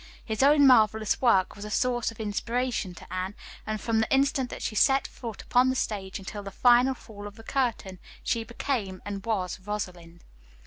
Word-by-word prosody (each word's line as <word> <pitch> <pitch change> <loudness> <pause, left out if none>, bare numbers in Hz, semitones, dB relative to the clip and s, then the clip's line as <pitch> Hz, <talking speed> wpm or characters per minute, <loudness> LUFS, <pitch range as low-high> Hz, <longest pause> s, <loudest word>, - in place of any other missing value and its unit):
His 220 +1 -2
own 285 +1 +6
marvelous 220 -4 +4
work 195 -7 +3
was 205 - -9
a 210 - -6
source 240 +2 0
of 225 - -12
inspiration 220 -1 -2
to 175 - -11
Anne, 185 +2 -3 0.3
and 215 0 -2
from 225 0 0
the 220 - 0
instant 270 -1 +2
that - - -7
she - - -2
set 270 +5 +4
foot 230 -4 -7
upon 250 +1 +3
the 260 - 0
stage 195 -6 -3
until 200 +2 -7
the 200 - -7
final 245 +5 +4
fall 205 -4 -10
of 205 - -11
the 225 - -13
curtain 225 -8 -2 0.2
she 230 -1 0
became 225 -5 -3
and 200 -1 -5
was 200 -6 -2
"Rosalind." 180 -4 -6
220 Hz, 190 wpm, -27 LUFS, 195-245 Hz, 0.3 s, own